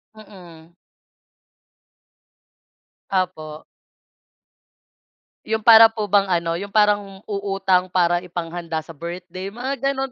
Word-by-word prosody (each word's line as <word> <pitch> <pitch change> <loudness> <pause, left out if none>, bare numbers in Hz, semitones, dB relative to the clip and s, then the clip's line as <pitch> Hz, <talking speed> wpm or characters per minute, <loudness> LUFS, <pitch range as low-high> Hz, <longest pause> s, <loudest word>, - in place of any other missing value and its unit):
Mm. 175 -6 -15 2.4
Opo. 160 -5 -3 1.8
Yung 220 0 -2
para 225 -1 +9
po 220 -1 -5
bang 200 -1 +3
ano, 170 -1 -1
yung 200 - -6
parang 205 -2 +1
uutang 195 -2 0
para 175 -1 +1
ipanghanda 170 -2 -5
sa 165 - -12
birthday, 180 +4 -8
mga 255 +6 -5
ganun. 270 -1 -4
185 Hz, 95 wpm, -21 LUFS, 170-210 Hz, 2.4 s, para